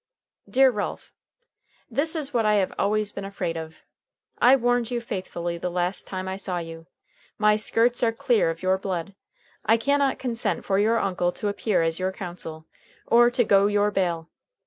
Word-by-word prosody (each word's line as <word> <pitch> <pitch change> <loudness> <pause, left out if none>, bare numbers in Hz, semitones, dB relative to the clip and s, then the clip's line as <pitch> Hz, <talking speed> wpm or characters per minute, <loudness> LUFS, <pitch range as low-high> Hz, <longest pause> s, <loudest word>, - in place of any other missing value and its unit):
"Dear 265 0 +5
Ralph: 210 -3 -5 0.7
"This 285 +7 -1
is 290 -3 -3
what 235 -2 +2
I 210 0 +3
have 195 -2 +1
always 210 0 +1
been 200 - -6
afraid 190 -4 -3
of. 160 -1 -8 0.6
I 255 +2 +7
warned 245 -2 +1
you 245 -1 -1
faithfully 175 -6 -4
the 180 - -2
last 180 +2 -2
time 185 -1 -5
I 190 0 -3
saw 190 -2 -3
you. 165 -1 -7 0.5
My 210 0 +4
skirts 230 +3 +2
are 230 -2 +3
clear 225 -4 +1
of 165 +2 -5
your 190 +1 +2
blood, 190 -1 -4 0.5
I 225 - +4
can 280 +5 +1
not 275 -1 +1
consent 230 -7 -2
for 195 0 +1
your 225 +3 +3
uncle 180 -4 0
to 210 - -3
appear 205 -3 0
as 165 +1 -1
your 185 +1 0
counsel 175 -4 -7 0.4
or 240 +1 +5
to 245 0 +2
go 200 -2 +4
your 205 0 +2
bail. 170 -4 -1
200 Hz, 185 wpm, -25 LUFS, 180-230 Hz, 0.7 s, I